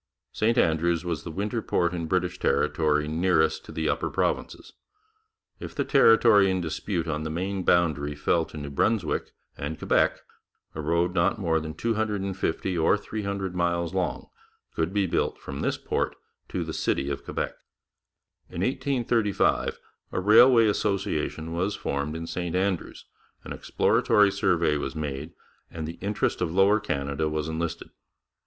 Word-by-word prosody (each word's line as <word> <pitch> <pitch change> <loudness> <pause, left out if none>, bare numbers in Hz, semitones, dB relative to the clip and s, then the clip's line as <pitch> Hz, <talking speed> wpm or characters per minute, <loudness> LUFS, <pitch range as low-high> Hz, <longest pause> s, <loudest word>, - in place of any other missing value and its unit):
St 115 +3 +1
Andrews 85 -1 +2
was 85 -3 -2
the - - -6
winter 105 +7 -2
port 85 -4 0
in 85 -2 -3
British 90 +1 -1
territory 75 -1 +1
nearest 80 -1 +1
to - - -10
the 80 -1 -2
upper - - 0
provinces. - - -2 0.9
If - - -8
the - - -1
territory 115 -6 +6
in 95 0 0
dispute 85 +1 -3
on 75 -1 -2
the 80 - -3
Maine 95 +4 -2
boundary 75 -5 +2
fell 80 +3 +1
to 80 - -11
New 70 -1 -6
Brunswick 100 +4 0 0.3
and 75 +3 -4
Quebec, - - +2 0.5
a 80 - -5
road 85 +3 +1
not 85 +5 +2
more 85 -5 +1
than 80 0 -6
250 100 -4 -1
or 80 +5 +4
300 100 -3 -4
miles 85 -1 0
long - - -2 0.5
could 80 +2 -1
be 100 -1 +1
built 90 - -1
from 70 - -7
this - - -1
port - - -2 0.3
to - - -2
the - - -5
city 70 +1 -1
of 70 - -4
Quebec. - - -3 1.0
In 85 - -5
1835 120 -3 +1 0.4
a - - 0
Railway 115 +4 +7
Association 100 -6 -1
was 95 +4 -1
formed 70 +2 -3
in 80 0 -5
St 90 0 -3
Andrews, 95 -1 -2 0.4
an - - -6
exploratory 105 -1 +3
survey 85 -6 +1
was 75 - -4
made, 75 +1 -4 0.4
and 80 -2 -6
the 85 - -8
interest 100 +2 -1
of - - 0
Lower 95 +4 +4
Canada 70 -5 -2
was 75 0 -2
enlisted. 80 +1 -4
85 Hz, 155 wpm, -26 LUFS, 80-100 Hz, 1.0 s, Railway